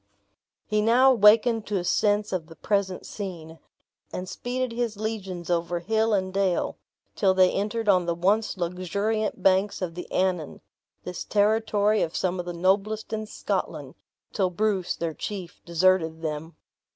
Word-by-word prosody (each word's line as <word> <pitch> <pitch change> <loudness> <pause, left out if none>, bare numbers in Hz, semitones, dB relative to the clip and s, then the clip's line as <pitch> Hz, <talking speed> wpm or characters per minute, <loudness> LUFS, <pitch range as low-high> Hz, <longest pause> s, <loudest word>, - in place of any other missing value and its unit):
He 210 0 +1
now 245 +5 +5
awakened 225 0 +5
to 205 - 0
a 180 - -2
sense 205 +2 +1
of 170 -4 -2
the 165 - -13
present 200 -2 -1
scene, 165 -5 -7 0.5
and 180 - -5
speeded 250 +4 -3
his 235 -3 -2
legions 195 -5 -4
over 170 0 0
his 220 +6 +1
and 190 -3 0
dale, 195 -3 0 0.4
till 190 -3 +3
they 185 -1 +5
entered 215 +3 -2
on 185 -3 +4
the 170 - 0
once 200 +5 +1
luxuriant 200 +5 -2
banks 190 +2 +3
of 180 -3 -3
the 180 +1 -8
Annan 180 -5 -1 0.4
this 180 0 -5
territory 215 0 +2
of 160 - -2
some 185 0 -1
of 175 - -4
the - - -2
noblest 195 +6 0
in 215 0 -3
Scotland, - - -3 0.4
till 190 -4 +1
Bruce, 190 0 0
their 165 -1 -3
chief, 185 0 -6
deserted 170 -2 +2
them. 155 +1 -4
195 Hz, 155 wpm, -26 LUFS, 175-215 Hz, 0.5 s, now